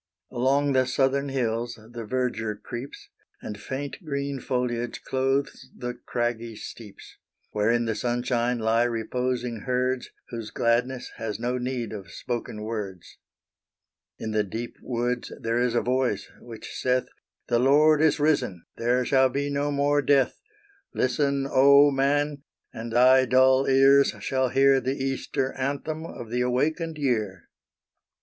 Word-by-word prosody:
Along 135 +3 +2
the 130 -1 +3
southern 135 +2 +1
hills 120 -2 -1
the 115 +1 -9
verdure 115 -3 -1
creeps, 120 +5 -8 0.3
And 105 0 -7
faint 140 +7 -5
green 140 -2 -3
foliage 120 -2 -2
clothes 135 +1 -1
the 125 0 -4
craggy 120 -2 -3
steeps, 105 -1 -11 0.3
Where 105 +1 +1
in 120 0 +2
the 115 - 0
sunshine 120 +1 0
lie 115 +1 +2
reposing 120 +1 -2
herds. 125 0 0 0.2
Whose 115 -3 -6
gladness 125 +2 0
has 110 -2 -4
no 125 +2 -1
need 125 -2 -3
of 95 -5 -8
spoken 115 +1 -5
words. 105 -5 -6 1.0
In 110 - -4
the 110 0 +2
deep 115 +4 -6
woods 120 0 -2
there 115 +1 0
is 125 -1 +1
a 120 - +3
voice, 125 -5 -1
which 115 -2 -10
saith 125 0 +1 0.4
"The 120 - +2
Lord 150 +4 +5
is 160 -2 +3
risen 130 - +1
there 125 +2 +1
shall 130 0 +4
be 140 +2 -2
no 140 +1 0
more 145 0 +2
death! 135 -1 +2 0.5
Listen, 140 +1 +1
Oh 140 +2 +6
Man! 145 +1 +1 0.3
and 115 +1 -6
thy 130 +2 +6
dull 130 +1 +4
ears 135 +1 +5
shall 130 -1 0
hear 135 +1 +4
The 130 +2 -1
Easter 135 0 -2
Anthem 145 +4 -3
of 115 -7 -9
the 125 +1 0
awakened 155 +6 0
year." 110 - -1
125 Hz, 140 wpm, -26 LUFS, 115-135 Hz, 1.0 s, Oh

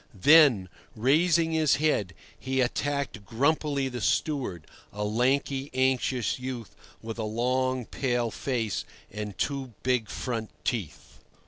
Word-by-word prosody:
Then, 140 - +6 0.3
raising 160 +8 +3
his 155 -5 +3
head, 110 - 0 0.2
he 130 0 -2
attacked 140 -2 -1
grumpily 140 +4 +1
the 125 -2 -5
steward, 120 - -1 0.3
a 105 +1 -4
lanky, 135 +5 0
anxious 130 -3 +1
youth 125 -4 -6 0.3
with 115 +1 -6
a - - -1
long, 125 +3 0
pale 120 -3 -1
face 115 -6 -2 0.3
and 105 -1 -6
two 135 -5 -3
big 125 -4 +1
front 115 -4 -3
teeth. 110 - -4
130 Hz, 120 wpm, -27 LUFS, 110-140 Hz, 0.3 s, Then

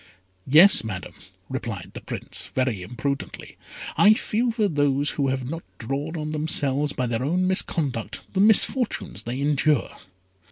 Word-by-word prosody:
"Yes, 165 - +7
Madam," 95 -5 -6 0.3
replied - - -5
the - - -8
Prince, - - -6
very 130 -7 0
imprudently, 125 +8 -5 0.4
"I 210 +1 +6
feel 230 +3 -1
for 220 -2 +1
those 145 -3 +1
who 140 -2 -1
have 130 -1 -2
not 165 +4 -5 0.2
drawn 140 +7 -4
on 155 0 -4
themselves 150 -2 +1
by 130 - -2
their 120 0 -2
own 180 +6 0
misconduct 155 - -2
the 190 - -1
misfortunes 215 - +3
they 120 +4 -5
endure." 145 -1 +1
145 Hz, 145 wpm, -24 LUFS, 130-170 Hz, 0.4 s, Yes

